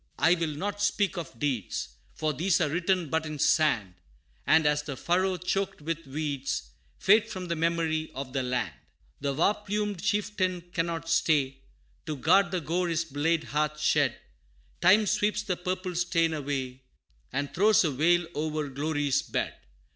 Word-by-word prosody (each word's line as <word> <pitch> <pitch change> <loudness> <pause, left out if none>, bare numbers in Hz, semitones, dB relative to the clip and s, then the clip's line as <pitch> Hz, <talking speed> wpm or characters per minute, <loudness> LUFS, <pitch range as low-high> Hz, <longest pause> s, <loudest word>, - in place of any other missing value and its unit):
I 160 +5 +5
will 165 -4 -1
not 205 +5 -3
speak 200 -3 +1
of 165 -9 -6
deeds, 125 -7 -2 0.3
For 155 -1 -1
these 170 +6 +2
are 160 -4 +1
written 175 0 0
but 160 0 +1
in 155 0 -5
sand 135 - +2 0.5
And, 160 0 +5
as 150 0 +3
the 145 -3 -6
furrow 185 +4 +1
choked 195 +2 -2
with 165 0 -4
weeds, 140 - -3 0.3
Fade 215 +3 +4
from 185 -4 -5
the 170 - 0
memory 165 -1 0
of 130 -1 -6
the 135 - 0
land. 125 - -1 0.5
The 140 0 -1
war 170 +7 +3
plumed 210 -2 -3
chieftain 205 -4 0
cannot 165 -1 -2
stay, 145 -5 +2 0.5
To 155 -2 -3
guard 175 +7 +4
the 180 -1 -2
gore 175 +4 0
his 165 0 0
blade 160 +2 0
hath 150 +1 -1
shed - - +2 0.6
Time 195 +5 +6
sweeps 210 +1 +1
the 190 -4 -1
purple 185 +1 -3
stain 170 -2 +1
away, 135 -3 -3 0.5
And 140 +2 -3
throws 210 +3 +5
a 155 - +1
veil 170 +6 +3
o'er 155 -1 -2
glory's 145 0 0
bed. - - -2
165 Hz, 160 wpm, -28 LUFS, 145-185 Hz, 0.6 s, Time